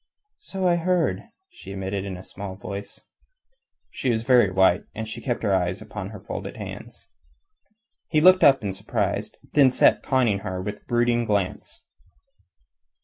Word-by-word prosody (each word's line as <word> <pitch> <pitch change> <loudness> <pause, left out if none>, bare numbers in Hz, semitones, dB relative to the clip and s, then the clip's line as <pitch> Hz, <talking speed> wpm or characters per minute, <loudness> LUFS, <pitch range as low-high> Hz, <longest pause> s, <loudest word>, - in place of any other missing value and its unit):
"So 190 - -3
I 175 -1 +3
heard," 165 - 0 0.3
she 345 - -11
admitted 95 0 -3
in 95 -2 -5
a 90 - -10
small 95 -1 -8
voice. 100 0 -8 0.9
She 130 - -2
was 115 -2 0
very 120 -4 +5
white, 95 -1 +3
and 110 0 -4
she 110 +2 -7
kept 120 -1 -3
her 100 - +2
eyes 90 0 0
upon 105 -2 -7
her 105 -1 -9
folded - - -7
hands. - - -9 1.0
He 155 - +2
looked 185 +3 +6
up 135 -4 +6
in 100 -2 -2
surprise, 95 - -2
and - - -24
then 140 -3 +6
sat 125 - +4
conning 125 -7 +1
her 95 -1 -5
with 105 +3 -6
brooding 120 0 +2
glance. 100 -4 -2
105 Hz, 160 wpm, -24 LUFS, 95-130 Hz, 1.0 s, looked